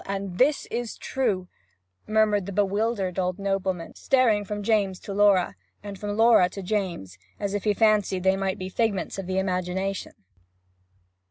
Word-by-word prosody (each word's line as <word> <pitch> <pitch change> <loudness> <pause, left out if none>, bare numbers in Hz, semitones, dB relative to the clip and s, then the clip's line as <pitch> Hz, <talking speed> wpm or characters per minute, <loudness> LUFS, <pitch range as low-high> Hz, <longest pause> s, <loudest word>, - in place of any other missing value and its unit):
And 195 -1 -3
is 280 +3 +3
this 235 -1 -3
true?' 210 -9 -1 0.6
murmured 215 -2 +2
the - - -4
bewildered 200 -1 0
old 180 0 -1
nobleman, 195 -3 -2
staring 245 -6 +2
from 205 +1 -5
James 200 -4 +1
to 200 - -6
Laura, 200 - +4 0.3
and 200 -2 -8
from 205 0 -4
Laura 225 -5 +5
to 195 +1 -8
James, 180 - -3 0.2
as 200 -1 -2
if 205 0 -3
he 210 -1 +2
fancied 210 -4 +2
they 190 0 +4
might 195 -1 -2
be 185 - -5
figments 200 -1 -1
of 190 - -5
the 185 0 -2
imagination. 190 +1 -2
195 Hz, 160 wpm, -25 LUFS, 185-210 Hz, 0.6 s, Laura